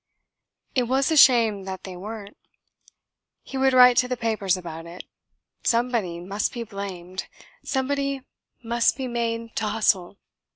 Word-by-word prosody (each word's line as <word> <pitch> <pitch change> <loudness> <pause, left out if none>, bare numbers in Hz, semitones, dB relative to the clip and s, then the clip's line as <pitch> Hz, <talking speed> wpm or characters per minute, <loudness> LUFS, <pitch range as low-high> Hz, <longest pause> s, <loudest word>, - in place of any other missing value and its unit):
It 250 -3 +1
was 265 +4 +1
a - - +3
shame 230 -8 +5
that 190 -1 -6
they 185 -1 -8
weren't. 205 +2 -8 1.1
He - - -10
would 265 0 +3
write 250 -1 +7
to 250 - +4
the 250 0 -2
papers 215 -5 0
about 165 -2 -8
it. 175 +2 -9 0.6
Somebody 230 -8 0
must 195 +4 -2
be 235 - -4
blamed, 190 -4 -7 0.4
somebody 275 0 -1 0.4
must 235 0 +2
be 265 -2 -3
made 230 -1 -3
to 220 - 0
hustle. 205 -3 +1
225 Hz, 140 wpm, -24 LUFS, 190-250 Hz, 1.1 s, write